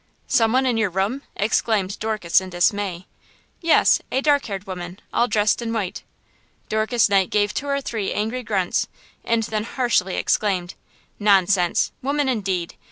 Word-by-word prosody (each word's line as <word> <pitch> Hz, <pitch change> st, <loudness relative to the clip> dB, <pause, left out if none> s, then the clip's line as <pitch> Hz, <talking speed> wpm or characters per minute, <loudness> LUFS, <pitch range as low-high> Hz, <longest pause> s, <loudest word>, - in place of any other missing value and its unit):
"Some 225 Hz, -4 st, +2 dB
one 260 Hz, +2 st, +2 dB
in 245 Hz, -3 st, +1 dB
your 220 Hz, -3 st, +1 dB
room!" 195 Hz, +9 st, -1 dB
exclaimed 210 Hz, -2 st, 0 dB
Dorcas 215 Hz, -5 st, +1 dB
in 190 Hz, -, -7 dB
dismay. 185 Hz, 0 st, 0 dB, 0.6 s
"Yes; 335 Hz, -2 st, +4 dB
a 265 Hz, -, +1 dB
dark 285 Hz, 0 st, +2 dB
haired 200 Hz, -2 st, -5 dB
woman, 180 Hz, 0 st, -7 dB
all 240 Hz, -, +3 dB
dressed 210 Hz, 0 st, +1 dB
in 230 Hz, -1 st, -3 dB
white!" 210 Hz, -5 st, -3 dB, 0.7 s
Dorcas 220 Hz, +2 st, +2 dB
Knight 195 Hz, -2 st, +2 dB
gave 210 Hz, 0 st, +1 dB
two 285 Hz, -, -3 dB
or 280 Hz, 0 st, 0 dB
three 220 Hz, -6 st, -3 dB
angry 220 Hz, +4 st, -2 dB
grunts 200 Hz, -6 st, 0 dB, 0.4 s
and 230 Hz, -1 st, +1 dB
then 215 Hz, -1 st, -2 dB
harshly 230 Hz, -6 st, 0 dB
exclaimed: 190 Hz, -4 st, 0 dB, 0.5 s
"Nonsense! 195 Hz, -3 st, +3 dB
woman, 280 Hz, +1 st, 0 dB
indeed! 190 Hz, -8 st, -1 dB
210 Hz, 155 wpm, -22 LUFS, 190-235 Hz, 0.7 s, Yes